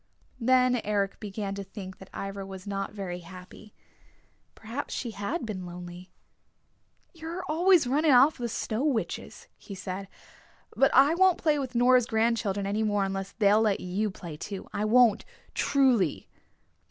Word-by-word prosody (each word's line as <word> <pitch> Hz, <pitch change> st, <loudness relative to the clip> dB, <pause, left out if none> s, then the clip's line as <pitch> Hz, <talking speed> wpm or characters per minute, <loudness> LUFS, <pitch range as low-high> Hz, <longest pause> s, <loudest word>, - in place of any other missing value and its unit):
Then 250 Hz, 0 st, +3 dB
Eric 200 Hz, -2 st, -1 dB
began 200 Hz, -1 st, -5 dB
to 200 Hz, 0 st, -5 dB
think 190 Hz, -1 st, -9 dB
that 190 Hz, -, -13 dB
Ivra 195 Hz, 0 st, -5 dB
was 190 Hz, -1 st, -9 dB
not 195 Hz, -1 st, -3 dB
very 190 Hz, -4 st, -5 dB
happy. 185 Hz, +4 st, -13 dB, 0.8 s
Perhaps 230 Hz, +6 st, -6 dB
she 240 Hz, -, -4 dB
had 220 Hz, -, -3 dB
been 200 Hz, -4 st, -5 dB
lonely. 175 Hz, +1 st, -9 dB, 1.0 s
"You're 335 Hz, +2 st, -6 dB
always 340 Hz, 0 st, +3 dB
running 295 Hz, +5 st, +2 dB
off 265 Hz, +3 st, +5 dB
with 240 Hz, -1 st, -2 dB
the -, -, -3 dB
Snow 220 Hz, +4 st, -2 dB
Witches," 270 Hz, -7 st, -3 dB
he 200 Hz, -, -9 dB
said. 190 Hz, +1 st, -6 dB, 0.7 s
"But 270 Hz, -, +4 dB
I 275 Hz, +4 st, +6 dB
won't 370 Hz, +1 st, +4 dB
play 305 Hz, -3 st, +1 dB
with 260 Hz, -2 st, -5 dB
Nora's 245 Hz, 0 st, +4 dB
grandchildren 220 Hz, -3 st, 0 dB
any 205 Hz, +2 st, -1 dB
more 205 Hz, -2 st, +1 dB
unless 195 Hz, 0 st, -4 dB
they'll 210 Hz, 0 st, +4 dB
let 210 Hz, -3 st, +2 dB
you 195 Hz, +4 st, -2 dB
play 170 Hz, -5 st, -9 dB
too. 195 Hz, +4 st, -7 dB
I 205 Hz, +1 st, -1 dB
won't, 225 Hz, -1 st, +4 dB, 0.3 s
truly!" 250 Hz, -, +2 dB
215 Hz, 155 wpm, -28 LUFS, 195-255 Hz, 1.0 s, I